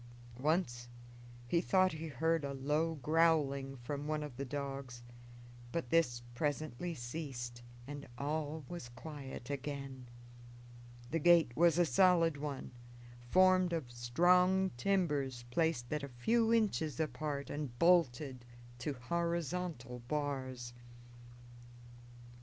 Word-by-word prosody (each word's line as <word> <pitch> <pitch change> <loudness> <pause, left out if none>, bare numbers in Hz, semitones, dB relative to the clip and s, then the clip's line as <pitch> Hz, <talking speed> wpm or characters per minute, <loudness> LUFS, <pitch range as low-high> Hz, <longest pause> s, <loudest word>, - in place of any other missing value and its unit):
Once 130 -5 0 0.6
he 170 +7 +2
thought 185 0 +3
he 160 +1 -5
heard 160 +1 +1
a 140 -1 -3
low 150 +4 0
growling 145 -3 +2
from 140 +4 -5
one 155 -1 -1
of 145 -4 -7
the 135 - -4
dogs, 135 -3 -5 0.7
but 130 -6 -3
this 125 -8 +2
presently 155 +4 -2
ceased, 120 -2 -5 0.2
and 145 +1 -7
all 150 +1 -2
was 170 -9 -7
quiet 135 0 -8
again. 135 -2 -5 1.0
The 165 - +1
gate 170 -4 +5
was 170 +1 +5
a 175 - +5
solid 170 -3 +4
one, 140 -2 -5 0.6
formed 185 0 +5
of 150 -8 -3
strong 180 +10 +3
timbers 140 -5 0
placed 150 -4 0
at 150 - -1
a 140 - -5
few 225 - +2
inches 195 - +1
apart 145 -1 -2
and 145 -5 -4
bolted 140 -6 +3 0.4
to 145 +4 -2
horizontal 170 -2 -2
bars. 130 -4 -3
145 Hz, 115 wpm, -35 LUFS, 130-165 Hz, 1.0 s, gate